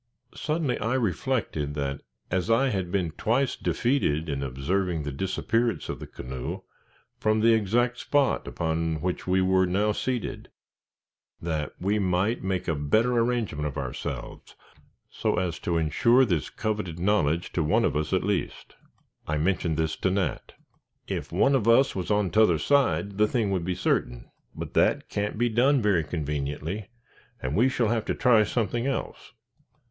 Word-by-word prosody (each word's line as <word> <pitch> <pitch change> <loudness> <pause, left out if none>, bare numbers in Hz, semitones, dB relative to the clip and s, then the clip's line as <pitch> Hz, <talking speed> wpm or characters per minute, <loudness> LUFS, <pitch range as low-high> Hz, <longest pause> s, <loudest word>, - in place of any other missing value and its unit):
Suddenly 155 -5 -1
I 115 +4 0
reflected 110 - -1
that 70 -1 -3 0.3
as 90 -1 0
I 130 +4 +3
had 95 -6 -2
been 90 -4 0
twice 120 - 0
defeated 85 - 0
in 70 -1 -2
observing 80 +6 -1
the 70 - -4
disappearance 95 - -1
of - - -4
the - - -8
canoe, 65 0 -6 0.6
from 110 0 +2
the 115 +1 +5
exact 120 +3 +1
spot 145 -2 +1
upon 80 -1 -1
which 90 0 -3
we 95 0 +3
were 95 0 +3
now 100 +4 +1
seated, 125 +2 -3 0.9
that 80 -4 -3
we 100 +3 +1
might 95 +4 0
make 95 -1 -2
a 80 - +1
better 80 +12 +2
arrangement 115 -11 0
of 70 - -6
ourselves, - - -6 0.6
so - - -1
as 90 -2 -1
to 85 - -1
insure 115 - +4
this 85 -9 -1
coveted 105 -6 -3
knowledge 85 -3 +1
to 85 - 0
one 75 - +2
of - - 0
us 75 0 -1
at 95 - +1
least. 100 -3 -3 0.5
I 75 - 0
mentioned 85 -1 0
this 80 -1 0
to 95 - 0
Nat. 95 0 -2 0.5
"If - - -4
one 140 - +3
of 120 -5 +1
us 125 +4 +5
was 95 -2 -3
on 105 -3 +1
t'other 105 -6 +4
side, 105 - +1
the 105 - +5
thing 110 -3 0
would 95 -3 0
be 90 0 -1
certain, - - -1 0.2
but - - -6
that - - +2
can't 105 +1 -2
be 120 +2 +2
done 130 +5 +3
very 100 -7 +2
conveniently, 75 +5 -4 0.5
and - - -3
we 125 +4 +4
shall 120 -4 0
have 115 -2 0
to - - -1
try 120 -4 +5
something 115 +3 -1
else." 135 - -4
95 Hz, 165 wpm, -26 LUFS, 80-115 Hz, 0.9 s, the